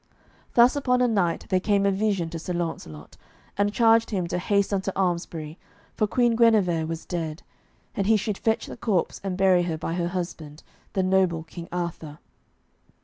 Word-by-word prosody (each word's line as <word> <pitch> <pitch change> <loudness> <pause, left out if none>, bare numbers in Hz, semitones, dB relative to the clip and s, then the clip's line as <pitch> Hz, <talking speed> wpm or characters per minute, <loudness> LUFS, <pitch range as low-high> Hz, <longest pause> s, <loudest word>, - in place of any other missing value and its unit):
Thus 240 +3 +6
upon 250 -3 +1
a - - +4
night 195 -7 0
there 185 - +3
came 200 +1 +1
a 200 - +3
vision 195 -4 -1
to 165 - -5
Sir 180 +2 -4
Launcelot, 160 - -5 0.4
and 205 +1 +1
charged 225 0 +4
him 190 -5 -1
to 180 - -1
haste 200 +2 +1
unto 195 0 -1
Almesbury, 170 -4 -2 0.3
for 215 - 0
Queen 240 +1 +2
Guenever 200 -9 +3
was 165 0 -5
dead, 165 -3 -4 0.5
and 195 - -1
he 220 0 +5
should 210 -1 -3
fetch 225 -1 0
the - - -9
corpse 200 -8 -1
and 190 -2 -3
bury 190 -2 +4
her 170 -2 -2
by 165 +1 -4
her 170 0 -1
husband, 170 -4 -6 0.3
the 190 -2 +1
noble 185 -3 +2
King 170 +1 -10
Arthur. 170 -4 -4
185 Hz, 180 wpm, -25 LUFS, 170-205 Hz, 0.5 s, Thus